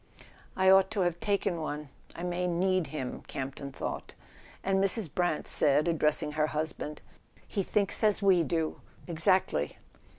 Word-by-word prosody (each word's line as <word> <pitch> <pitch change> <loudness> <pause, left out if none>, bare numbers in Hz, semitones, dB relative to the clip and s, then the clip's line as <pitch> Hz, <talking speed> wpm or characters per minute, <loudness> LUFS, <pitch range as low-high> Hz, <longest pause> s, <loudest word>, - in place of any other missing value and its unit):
"I 190 0 +2
ought 190 0 +6
to - - +3
have 175 -1 0
taken 200 -5 0
one—I 150 +2 -7
may 180 0 -1
need 180 -1 +1
him, 135 -3 -5
Campton 135 +1 -5
thought; - - -5 0.5
and 195 0 +2
Mrs. 195 - 0
Brant 175 -4 0
said, 145 +3 +4
addressing 155 -2 +1
her 155 0 +1
husband: 155 -1 -4 0.5
"He 200 - -1
thinks 200 +2 0
as 210 -2 +4
we 190 -4 +4
do—exactly. 165 - -1
170 Hz, 135 wpm, -30 LUFS, 150-190 Hz, 0.5 s, ought